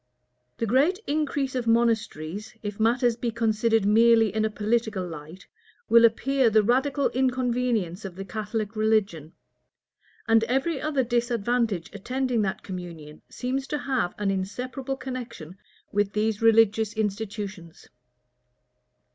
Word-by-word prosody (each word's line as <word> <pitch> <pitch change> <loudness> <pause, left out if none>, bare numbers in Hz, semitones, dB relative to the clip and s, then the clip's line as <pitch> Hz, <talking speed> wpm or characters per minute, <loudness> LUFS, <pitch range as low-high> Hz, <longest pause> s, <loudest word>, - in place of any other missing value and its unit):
The 230 - -1
great 275 - +3
increase 285 -2 -1
of 250 -2 -2
monasteries, 220 -4 0
if 205 0 -5
matters 240 +1 +2
be 235 0 -2
considered 225 -1 +1
merely 225 0 +5
in 215 0 0
a 220 - +1
political 215 -3 -1
light, 165 +3 -10 0.4
will 230 +1 +7
appear 255 +2 +2
the 215 0 +4
radical 270 +5 +1
inconvenience 245 -7 0
of 190 -3 -7
the 195 +1 -7
Catholic 215 +1 -4
religion; 205 -8 0 0.9
and 225 0 +4
every 270 +5 0
other 290 -4 0
disadvantage 235 -5 0
attending 250 +3 -1
that 195 -2 -2
communion 170 -5 -8
seems 265 +2 -3
to 300 - -2
have 260 -10 -1
an 205 -1 0
inseparable 250 +8 -4
connection 245 - -7 0.4
with 205 0 0
these 215 0 0
religious 225 -1 +4
institutions. 205 -4 -5
225 Hz, 125 wpm, -26 LUFS, 205-250 Hz, 0.9 s, will